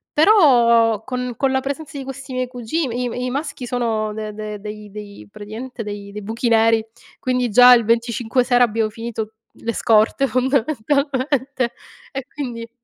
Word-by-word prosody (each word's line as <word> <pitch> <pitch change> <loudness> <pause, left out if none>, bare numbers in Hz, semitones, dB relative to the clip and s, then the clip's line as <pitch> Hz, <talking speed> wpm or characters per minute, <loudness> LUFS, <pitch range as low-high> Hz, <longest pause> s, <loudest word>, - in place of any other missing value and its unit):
Però, 235 - +5
con 250 -1 -4
con 270 - +1
la 265 - +2
presenza 285 +3 -5
di 275 - -5
questi 270 0 -8
miei 255 0 -1
cugi 250 +6 -3
i 250 -2 -2
m - - -6
i 250 0 -2
maschi 275 -2 -4
sono 225 -3 -1
de 215 0 -5
dei 210 -1 -6
dei 210 0 -8
dei 205 - -10
praticamente, 225 +4 -8
dei 205 -1 -6
dei 210 +1 -7
buchi 230 +4 -2
neri, 225 0 +4 0.3
quindi 250 -2 0
già 250 +3 +8
il 235 -1 +4
25 235 +2 +1
sera 245 0 +4
abbiamo 220 -1 -1
finito 225 -1 -5 0.2
le 230 - -4
scorte, 225 +6 +3
fondamentalmente, 265 0 0 0.4
e 270 -1 -5
quindi 235 -5 -6
240 Hz, 165 wpm, -20 LUFS, 220-260 Hz, 0.4 s, già